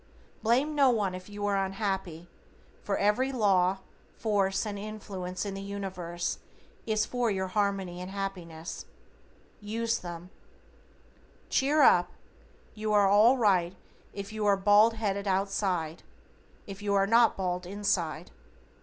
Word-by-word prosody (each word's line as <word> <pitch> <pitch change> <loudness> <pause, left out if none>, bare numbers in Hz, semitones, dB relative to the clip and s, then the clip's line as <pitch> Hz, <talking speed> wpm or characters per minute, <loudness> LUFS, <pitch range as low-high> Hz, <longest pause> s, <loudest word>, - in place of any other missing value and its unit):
Blame 255 +7 +2
no 280 -3 +5
one 210 -6 +1
if 185 +2 -9
you 205 0 -5
are 200 -1 +1
unhappy, 190 -4 -3 0.5
for 200 - -1
every 210 +7 +2
law, 195 -5 +2 0.4
force 200 -2 0
and 205 -1 -4
influence 200 -3 -5
in 200 - -4
the 195 - -6
Universe 185 -4 -4 0.5
is 215 -1 +1
for 245 -2 -1
your 190 -2 -2
Harmony 195 -3 -1
and 180 - -6
Happiness. 180 -5 -6 0.7
USE 225 +2 -2
THEM. 175 0 -8 1.2
Cheer 285 +2 +3
up. 175 -7 +5 0.6
You 215 0 -3
are 205 -1 +5
all 215 +6 +5
right 190 -6 +2 0.4
if 200 +1 -7
you 215 -1 -3
are 200 -1 +4
bald 205 +3 +5
headed 200 -2 -2
outside, 190 -4 -1 0.6
if 200 0 -9
you 200 -1 0
are 195 0 +4
not 230 +3 +4
bald 180 -1 -2
inside. 185 -5 -2
200 Hz, 135 wpm, -29 LUFS, 185-215 Hz, 1.2 s, no